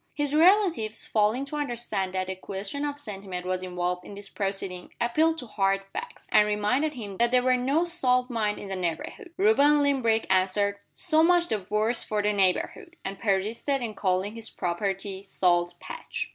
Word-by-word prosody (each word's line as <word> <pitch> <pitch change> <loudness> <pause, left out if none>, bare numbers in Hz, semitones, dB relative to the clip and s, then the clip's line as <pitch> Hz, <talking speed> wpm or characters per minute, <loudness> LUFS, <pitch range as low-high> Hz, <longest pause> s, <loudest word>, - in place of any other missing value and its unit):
His 290 -1 -1
relatives, 330 - +3
failing 220 +5 +1
to 295 +2 -5
understand 235 -9 -2
that 185 0 -1
a 190 - -3
question 195 +9 -5
of 290 0 -3
sentiment 195 -8 -6
was 185 0 -1
involved 180 0 -2
in 200 - -10
this 200 0 -9
proceeding, 195 -2 -4
appealed 315 +7 +2
to 255 - -7
hard 195 -3 0
facts, 485 - -7
and 210 - +5
reminded 250 +9 0
him 205 -6 -7
that 235 0 +3
there 250 0 +3
were 255 0 +4
no 275 +7 +1
salt 255 -8 +1
mines 220 -4 -1
in 200 - -7
the 190 - -2
neighborhood. 180 - -4
Reuben 295 -8 +5
Limbrick 235 -6 +2
answered, 195 +2 +1 0.2
"So 315 -3 +3
much 345 +1 +4
the 200 -4 -2
worse 215 +3 +1
for 210 -1 -2
the 210 0 +2
neighborhood" 205 - 0
and 195 0 -5
persisted 225 +7 0
in 225 -2 -3
calling 190 +1 0
his 225 -1 -7
property, 190 +2 -3
"Salt 175 -3 +1
Patch." - - -6
215 Hz, 180 wpm, -27 LUFS, 195-280 Hz, 0.2 s, and